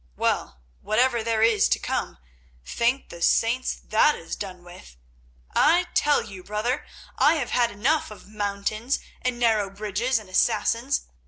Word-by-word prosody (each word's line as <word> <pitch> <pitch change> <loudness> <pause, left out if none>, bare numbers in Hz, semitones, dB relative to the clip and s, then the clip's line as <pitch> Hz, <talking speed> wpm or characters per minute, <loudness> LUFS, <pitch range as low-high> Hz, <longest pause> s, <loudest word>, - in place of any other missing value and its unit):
Well, 60 0 -1 0.2
whatever 235 +2 +1
there 225 -1 +1
is 225 -2 +4
to - - +3
come, - - -3 0.5
thank 245 +3 0
the 170 - -10
Saints, 235 +8 +2
that 260 +7 +3
is - - -6
done 185 -3 -7
with. 175 - -14 0.6
I 350 +4 +3
tell 295 0 +3
you, 195 -4 -10
brother, 215 +7 -2 0.3
I 310 - +5
have 275 -6 -3
had 240 -1 +2
enough 255 +9 0
of 215 - -12
mountains, 210 +4 -2 0.2
and 250 -1 -1
narrow 220 -4 +2
bridges, 215 +5 -1
and 215 -3 -7
Assassins. 230 +7 +1
225 Hz, 150 wpm, -25 LUFS, 205-250 Hz, 0.6 s, I